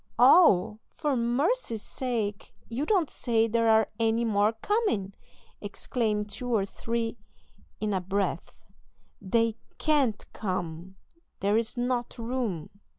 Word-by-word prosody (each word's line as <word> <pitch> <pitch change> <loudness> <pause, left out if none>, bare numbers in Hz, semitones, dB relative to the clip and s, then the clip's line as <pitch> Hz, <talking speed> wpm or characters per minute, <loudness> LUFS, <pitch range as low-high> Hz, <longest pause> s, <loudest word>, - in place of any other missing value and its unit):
"All! 235 - +6 0.2
for 295 -2 0
mercy's 240 - 0
sake, 225 -6 -3
you 260 +6 -2
don't 375 -7 +3
say 225 -4 +1
there 230 0 +2
are 220 0 +5
any 225 +1 +2
more 210 0 +2
coming!" 225 - -1 0.5
exclaim 210 +1 -2
two 230 +4 -5
or 210 -4 +2
three 230 +3 -3 0.6
in 210 -1 -1
a 190 - 0
breath; 195 +2 -3 0.6
"they 225 +3 +1 0.2
can't 280 -8 +1
come; 185 -2 -4 0.5
there 200 +1 +2
is 225 +2 0
not 245 0 -1
room!" 230 -8 -3
225 Hz, 120 wpm, -28 LUFS, 205-245 Hz, 0.6 s, All